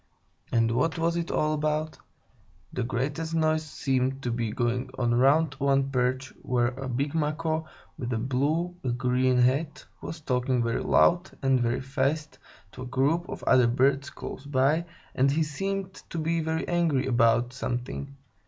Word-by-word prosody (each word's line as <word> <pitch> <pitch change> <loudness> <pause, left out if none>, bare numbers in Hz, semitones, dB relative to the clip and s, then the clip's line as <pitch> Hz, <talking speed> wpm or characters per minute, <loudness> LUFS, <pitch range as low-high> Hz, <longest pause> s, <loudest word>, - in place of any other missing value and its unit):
And 115 -1 +2
what 130 +8 +1
was 165 +1 +1
it 170 0 -2
all 155 0 +1
about? 155 +1 -1 0.7
The - - -2
greatest 140 +7 -2
noise 155 -1 +2
seemed 135 -2 -1
to 120 - -1
be 115 -1 -1
going 125 +3 -1
on 120 -1 +1
round 140 +5 +4
one 135 0 +2
perch, 130 +1 0
where 120 -1 +1
a 130 +1 -6
big 140 +4 -1
Macaw, 160 +1 -1 0.3
with 125 -3 -3
a 115 - 0
blue 145 +9 0
and 120 -2 -2
green 125 0 +2
head, 140 +5 +1 0.2
was 160 - -6
talking 125 -3 0
very 115 0 -1
loud 175 +2 +3
and 135 -1 +3
very 120 +1 0
fast 140 +3 -2 0.3
to 130 - -10
a - - -5
group 140 +7 +1
of - - -6
other 125 -2 +5
birds 135 +3 +2
close 140 - -8
by, 145 +4 +2 0.3
and 135 +2 +3
he 155 +3 +2
seemed 195 +5 -3 0.2
to - - -5
be 165 +1 0
very 160 0 -2
angry 165 -6 +1
about 120 -1 +3
something. 125 +2 -4
135 Hz, 165 wpm, -27 LUFS, 125-155 Hz, 0.7 s, other